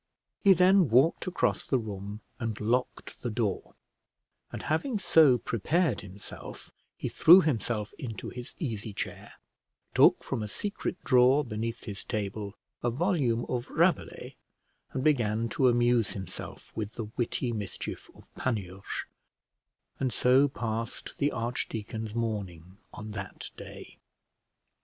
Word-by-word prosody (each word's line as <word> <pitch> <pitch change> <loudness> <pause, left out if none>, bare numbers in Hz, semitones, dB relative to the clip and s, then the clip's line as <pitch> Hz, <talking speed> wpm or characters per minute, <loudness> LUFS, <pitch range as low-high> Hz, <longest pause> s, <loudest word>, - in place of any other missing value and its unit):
He 200 -2 +7
then 185 -2 +5
walked 135 - +4
across 185 - 0
the 135 - +3
room 105 -2 -6 0.2
and 115 -2 -3
locked 120 +4 -1
the 120 - -2
door; 105 -3 -2 0.8
and - - -6
having 215 - 0
so 155 -9 +6
prepared 125 - 0
himself, 100 0 -10 0.3
he - - -3
threw 175 +4 +8
himself 115 - -1
into 115 -6 -5
his 125 +1 -8
easy 110 - -4
chair, - - -6 0.6
took - - +6
from - - -3
a 105 - -3
secret 200 - -4
drawer 130 +3 +5
beneath 115 0 -4
his 100 -3 -6
table 100 0 -4 0.3
a 120 - +1
volume 130 -5 +1
of 125 +1 -3
Rabelais, 170 0 0 0.5
and 130 - -2
began 115 -6 +2
to 130 +4 +3
amuse 120 -2 +3
himself 95 -2 -8
with 105 -1 -3
the 115 - -3
witty 120 +1 -1
mischief 105 -3 -5
of - - -17
Panurge; 100 -6 -3 0.9
and 130 -2 0
so 130 +4 +4
passed 115 -3 -4
the 145 +1 +2
archdeacon's 110 -2 -3
morning 100 -5 -4
on 110 0 -8
that 100 -2 -6
day. - - -11
115 Hz, 130 wpm, -29 LUFS, 105-135 Hz, 0.9 s, threw